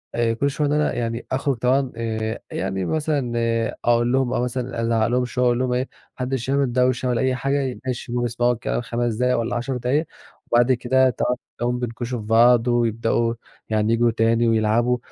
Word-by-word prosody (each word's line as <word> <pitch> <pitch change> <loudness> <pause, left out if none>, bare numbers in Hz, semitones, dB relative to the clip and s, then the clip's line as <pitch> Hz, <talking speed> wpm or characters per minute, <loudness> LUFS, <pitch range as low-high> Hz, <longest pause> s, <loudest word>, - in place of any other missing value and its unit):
آآ 115 -1 +1
كل 140 +5 0
شوية 145 +1 -1
إن 145 - 0
أنا 150 0 +1
يعني 115 0 -3
أخرُج 135 0 0
طبعًا 130 +2 +1
آآ، 110 -1 -3
يعني 95 -1 -2
مثلًا 150 - -1 0.5
أقول 120 0 +3
لهُم 130 -1 +1
أو - - 0
مثلًا 125 -1 -3
أزعّق 115 -1 +1
لهم 125 +1 +1
شوية، 125 +1 -1
أقول 120 0 +2
لهم 125 -1 0
إيه: 125 - +1
"ما - - -10 0.3
حدّش 130 -1 -3
يعمل 140 -2 +1
دوشة 125 0 +1
ولا 120 -2 +1
أي 130 0 +1
حاجة، 135 0 -1
ماشي؟" 125 -1 -4
بيسمَعوا 120 0 +1
الكلام 120 +1 -2
5 120 0 -2
دقايق 125 +2 +1
والّا 115 0 -2
10 125 +2 -2
دقايق 130 +6 0 0.5
وبعد 120 +2 +4
كده 130 +1 +3
تقعُد 125 0 -1 0.2
تلاقيهم 120 +1 -1
بينكُشوا 120 0 -4
في 105 - -8
بعض 115 +2 +5
ويبدؤوا 115 -1 +1 0.4
يعني 110 0 +1
ييجوا 120 0 +3
تاني 115 +1 +2
ويلعبوا، 115 +2 +2
120 Hz, 190 wpm, -22 LUFS, 115-130 Hz, 0.5 s, بعض